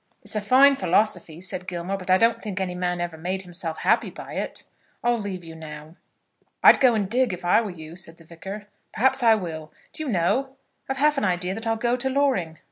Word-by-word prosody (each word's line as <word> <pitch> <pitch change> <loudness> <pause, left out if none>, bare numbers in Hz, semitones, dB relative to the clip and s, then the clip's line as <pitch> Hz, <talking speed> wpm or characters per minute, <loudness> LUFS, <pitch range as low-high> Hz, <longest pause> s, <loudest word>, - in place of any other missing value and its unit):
"It's 210 +1 -8
a 215 - 0
fine 265 +7 +6
philosophy," 180 - 0
said 185 0 -3
Gilmore, 180 +2 -3
"but 185 -1 -8
I 185 - +6
don't 230 +3 +2
think 205 -3 -4
any 185 -2 -2
man 180 0 -2
ever 175 -2 -4
made 185 +3 -3
himself 170 -2 -5
happy - - +2
by - - -10
it. - - -4 0.4
I'll 240 -1 +2
leave 195 -4 -5
you 165 -1 -9
now." 155 0 -10 0.7
"I'd - - +8
go 255 -4 +5
and 205 -3 0
dig, 245 0 +2
if 180 0 -7
I 180 - +4
were 220 - -4
you," 160 -2 -10
said 170 -2 -7
the 165 - -17
Vicar. 190 +6 -8 0.3
"Perhaps 265 +3 +2
I 225 -2 +6
will. 160 -6 -6 0.2
Do - - -6
you 305 - -3
know, 255 +8 0 0.3
I've 270 - -2
half 295 +1 +3
an - - -4
idea 180 -1 0
that 225 +3 -3
I'll 225 - +2
go 240 +2 0
to 255 +1 -1
Loring." 260 - 0
190 Hz, 225 wpm, -24 LUFS, 175-235 Hz, 0.7 s, I'd